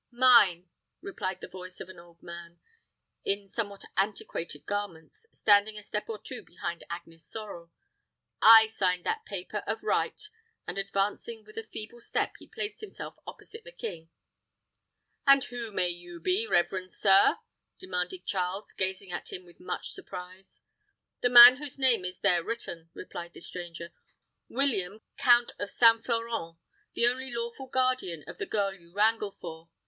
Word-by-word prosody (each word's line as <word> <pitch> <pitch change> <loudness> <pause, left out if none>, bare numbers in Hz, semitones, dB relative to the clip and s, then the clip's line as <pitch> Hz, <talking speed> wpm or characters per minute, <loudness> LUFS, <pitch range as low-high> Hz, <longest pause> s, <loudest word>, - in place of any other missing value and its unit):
"Mine," 235 -8 +5 0.3
replied 195 - -4
the - - -7
voice 185 0 -9
of - - -7
an 185 -2 -12
old 170 0 -18
man, 170 0 -10 0.6
in 200 0 -1
somewhat 200 -1 -4
antiquated 170 -6 -2
garments, 205 - -5
standing 210 +1 +3
a 210 - -7
step 210 +2 -4
or 225 - -3
two 245 +4 -6
behind 170 -1 -6
Agnes 165 -1 -8
Sorel. 200 -6 -9 0.7
"I 225 0 +10
signed 185 -5 0
that 445 0 -1
paper, - - -5
of - - -2
right;" - - 0 0.5
and - - -3
advancing 200 +3 -2
with 215 - -16
a 225 -1 -6
feeble 225 +3 -8
step, - - -1
he - - -14
placed 420 +1 -5
himself 430 - -8
opposite 450 +1 -10
the - - -12
king. 175 - -7 1.2
"And 275 -1 +7
who 240 -4 -6
may 180 -3 +1
you 175 0 -8
be, 385 +5 0
reverend 185 - +1
sir?" 195 -1 +5 0.4
demanded 180 - -4
Charles, 190 +2 -3
gazing 190 0 -3
at 175 - -4
him 180 - -7
with 175 - -19
much - - -4
surprise. 185 +1 -9 0.6
"The 245 - +2
man 245 +1 +11
whose 290 -1 -6
name 250 -8 +3
is 180 0 -6
there 175 -2 +3
written," 170 -8 -6
replied 170 -1 -8
the - - -11
stranger. 170 -1 -7 0.6
"William, 220 -7 0
count 240 -1 +5
of 205 - -3
St. 230 -1 +5
Florent; 230 -8 -2 0.4
the 235 - +3
only 260 +2 0
lawful 235 +3 -5
guardian 255 - 0
of - - -10
the - - -3
girl 200 -2 0
you 170 -3 -18
wrangle 210 +1 +2
for. 165 -3 -10
200 Hz, 155 wpm, -29 LUFS, 180-235 Hz, 1.2 s, man